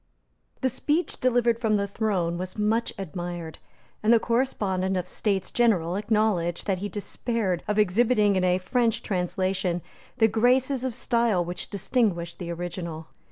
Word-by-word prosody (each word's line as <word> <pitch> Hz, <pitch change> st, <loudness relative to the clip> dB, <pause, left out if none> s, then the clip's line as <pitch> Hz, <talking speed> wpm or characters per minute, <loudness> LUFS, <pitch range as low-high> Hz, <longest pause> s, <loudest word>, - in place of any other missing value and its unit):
The 260 Hz, -, +2 dB
speech 300 Hz, +7 st, 0 dB
delivered 240 Hz, -2 st, +2 dB
from 220 Hz, -3 st, +2 dB
the 200 Hz, 0 st, -1 dB
throne 190 Hz, -5 st, -1 dB
was 185 Hz, +2 st, -5 dB
much 220 Hz, +2 st, +1 dB
admired; 175 Hz, -3 st, -6 dB, 0.4 s
and 215 Hz, -, +3 dB
the 235 Hz, -, +6 dB
correspondent 200 Hz, -7 st, 0 dB
of 180 Hz, -, -2 dB
the -, -, -13 dB
States 195 Hz, -3 st, -1 dB
General 185 Hz, -8 st, +2 dB
acknowledged 205 Hz, -5 st, 0 dB
that 195 Hz, -3 st, 0 dB
he 205 Hz, +2 st, -3 dB
despaired 205 Hz, -3 st, -2 dB
of 210 Hz, -, 0 dB
exhibiting 210 Hz, +1 st, +3 dB
in 185 Hz, -, +1 dB
a 180 Hz, 0 st, +3 dB
French 230 Hz, +4 st, 0 dB
translation 185 Hz, -1 st, -1 dB, 0.3 s
the 225 Hz, -3 st, +5 dB
graces 250 Hz, +4 st, +2 dB
of 255 Hz, -3 st, -2 dB
style 230 Hz, -7 st, +1 dB
which 175 Hz, +1 st, -5 dB
distinguished 195 Hz, -5 st, 0 dB
the 175 Hz, -2 st, -5 dB
original. 170 Hz, -2 st, -5 dB
200 Hz, 155 wpm, -26 LUFS, 180-230 Hz, 0.4 s, the